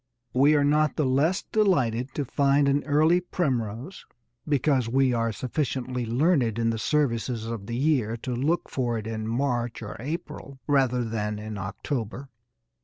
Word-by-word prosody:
We 140 +4 +5
are 145 - +3
not 150 +1 +2
the 150 - +1
less 145 +8 +2
delighted 130 - +1
to 145 - -1
find 140 +2 +2
an 140 +1 +2
early 155 +4 +4
primrose 130 - -3 0.4
because 135 -4 +2
we 130 +1 +3
are 115 -1 0
sufficiently 125 +1 -2
learned 125 - +2
in 115 0 +1
the 115 - -3
services 115 -3 0
of 115 -3 -5
the 115 - -3
year 130 -6 +1
to 125 - -2
look 150 +8 0
for 120 -3 -1
it 110 - -5
in 110 -1 -4
March 120 -1 -1
or 105 - -7
April 140 -1 -6
rather 130 -4 +2
than 105 -2 -2
in 105 0 -6
October. 120 +6 -4
130 Hz, 160 wpm, -26 LUFS, 115-145 Hz, 0.4 s, We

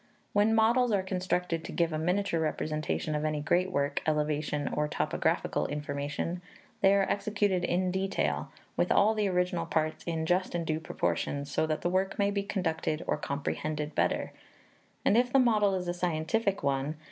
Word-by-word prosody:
When 210 +2 +4
models 235 +2 +4
are 200 -2 +2
constructed 180 -3 -1
to - - -7
give 170 -2 0
a 155 - -1
miniature 180 +1 0
representation 155 -1 -1
of 150 0 -1
any 155 -1 0
great 175 +5 +1
work, 140 0 0
elevation, 150 -1 0
or 150 0 +1
topographical - - 0
information, 145 +4 -3 0.4
they 195 0 +6
are 195 -1 +3
executed 200 -2 0
in 180 +1 +1
detail, 190 +1 -1 0.2
with - - +1
all 215 +2 +5
the 210 -2 +1
original 180 -2 0
parts 155 -1 -1
in 165 -2 -2
just 180 +2 +1
and 170 -1 -1
due 155 0 -1
proportions, 140 - -2
so 160 - +1
that 155 -1 -1
the 175 - 0
work 190 +1 0
may 200 0 +2
be 200 0 0
conducted 165 -5 -2
or - - +1
comprehended 150 +2 -3
better; - - 0 0.7
and 210 - +4
if 245 0 +1
the 270 - +5
model 215 -6 +4
is 180 -1 -3
a 175 - 0
scientific 180 +4 0
one, 140 +2 0
viz. 155 - -20
175 Hz, 180 wpm, -30 LUFS, 155-195 Hz, 0.7 s, they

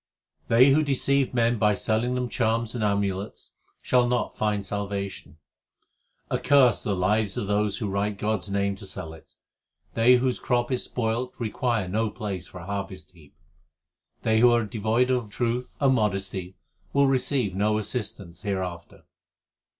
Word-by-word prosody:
They 125 +4 +6
who 150 +3 +4
deceive 140 -1 +1
men 120 -2 +1
by 105 -1 +3
selling 115 +5 0
them 125 0 -1
charms 115 -1 0
and 120 -3 -2
amulets 100 -1 -2 0.3
shall 125 -1 +3
not 120 0 -1
find 105 -2 -1
salvation: 100 -5 -5 0.9
Accursed 130 -5 +4
the 100 - -1
lives 100 +2 +1
of - - -2
those 105 0 0
who 110 - -3
write 100 +1 -1
God 110 +1 0
s - - -10
name 100 0 0
to - - -9
sell 80 0 -6
it. 80 - -17 0.6
They 120 +2 +5
whose 125 0 0
crop 120 0 0
is 125 - 0
spoiled 120 +1 -2
require 115 -2 -1
no 110 +4 0
place 100 -4 -5
for - - -11
a - - -10
har\ 100 0 -3
v 95 - -9
t 95 - -13
heap. 75 -4 -20 0.9
They 110 0 +3
who 120 +1 +7
are 120 -2 +2
devoid 115 +4 +1
of 125 -4 -1
truth 120 +3 -2
and 135 -2 +4
modesty 95 -4 -2 0.4
will 140 0 +4
recvivr 130 -5 +1
no 105 +3 +1
assistance 105 -5 -5
hereafter. 95 -4 -5
110 Hz, 165 wpm, -26 LUFS, 100-120 Hz, 0.9 s, who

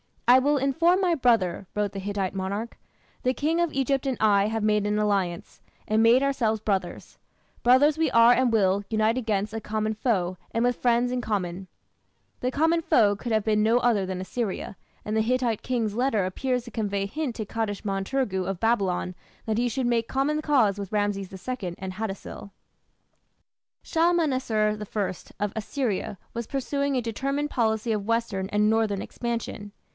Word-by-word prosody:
"I 250 +2 +8
will 290 +3 +2
inform 330 +7 +2
my 360 -2 +2
brother," 225 - +1
wrote 210 -1 0
the 195 - -6
Hittite 195 -1 -2
monarch; 200 +4 -4 0.4
"the 255 - +1
King 315 +5 0
of 345 -2 +1
Egypt 275 0 0
and 260 -3 -1
I 205 -2 +4
have 220 0 -2
made 210 -1 +2
an 210 0 0
alliance, 195 -5 -1 0.3
and 215 +1 +2
made 235 +4 +5
ourselves 230 -6 0
brothers. 195 -4 -3 0.4
Brothers 270 +5 +5
we 320 -2 +2
are 230 0 +7
and 250 0 +3
will 200 -2 +2
[unite 220 +2 +1
against] 215 -3 -1
a 225 - -2
common 215 0 -2
foe, 190 -6 -1
and 230 - 0
with 245 -1 +1
friends 240 0 +2
in 250 - -1
common." 190 -5 -3 0.7
The 250 - -1
common 325 +5 +2
foe 210 -9 +3
could 230 +3 -4
have 215 -1 +2
been 215 -1 +2
no 225 +3 +4
other 230 -6 +2
than 185 0 -4
Assyria, 195 0 -4 0.3
and 215 +1 -2
the - - +3
Hittite 240 -1 0
king's 230 -5 -1
letter 235 -5 +1
appears 250 +6 -1
to 235 - -11
convey 200 -3 -2
a - - -3
hint 280 +1 -3
to 220 - -4
Kadashman 205 -3 -3
turgu 195 -8 -1
of 195 -2 -3
Babylon 195 -5 +1 0.3
that 220 -1 -1
he 245 - +2
should 260 +2 -2
make 235 -1 +1
common 290 +3 0
cause 240 -10 +2
with 200 0 -6
Rameses 205 -2 -1 0.2
II 205 -9 -3
and 190 0 -6
Hattusil. 200 -1 -6 1.3
Shalmaneser 260 -11 +1
I 210 -1 -2 0.3
of 205 - -2
Assyria 220 -3 -2 0.2
was 235 -1 -4
pursuing 280 +1 -1
a 250 - +1
determined 275 +6 -2
policy 225 -1 0
of 210 -2 -2
western 230 -5 -1
and 210 0 +2
northern 220 -3 +1
expansion. 230 -3 -5
220 Hz, 175 wpm, -26 LUFS, 205-255 Hz, 1.3 s, I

